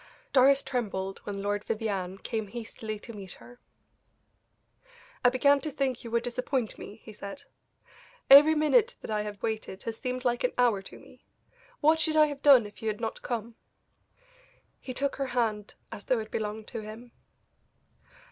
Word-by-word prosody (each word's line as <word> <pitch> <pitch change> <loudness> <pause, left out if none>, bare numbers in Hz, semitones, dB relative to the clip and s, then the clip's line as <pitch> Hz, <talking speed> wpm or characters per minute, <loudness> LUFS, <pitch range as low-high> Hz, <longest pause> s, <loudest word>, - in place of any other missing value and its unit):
Doris 275 +1 +5
trembled 200 -7 -3
when 200 -1 -4
Lord 205 0 -1
Vivianne 200 -4 -3
came 220 +2 -3
hastily 220 -1 -6
to 230 +3 -11
meet 195 -3 -7
her. 245 0 -15 1.6
"I 245 - +7
began 280 +3 +3
to 310 - -3
think 265 -3 -2
you 235 - -7
would 235 +1 0
disappoint 250 -1 -2
me," 205 - -9
he 220 - -11
said; 200 +7 -8 0.8
"every 295 +3 +9
minute 430 +11 +3
that - - -7
I 210 -1 0
have 210 -1 -7
waited 220 -3 -3
has 225 -1 -5
seemed 255 0 -3
like 240 -1 +1
an 250 - +1
hour 235 -5 +3
to 195 - -11
me. - - -18 0.6
What 315 +1 +4
should 315 -1 0
I 305 - +8
have 290 -2 -5
done 270 -6 +7
if 205 +3 -12
you 220 - -4
had 210 -1 -1
not 225 -1 -4
come?" 235 -1 -4 1.3
He 260 - -7
took 280 +1 -1
her 275 -1 -1
hand 215 -3 -1 0.2
as 205 - -8
though 255 - +2
it 220 -1 -5
belonged 215 0 -3
to 230 - -5
him. 220 +3 -10
235 Hz, 175 wpm, -29 LUFS, 210-265 Hz, 1.6 s, every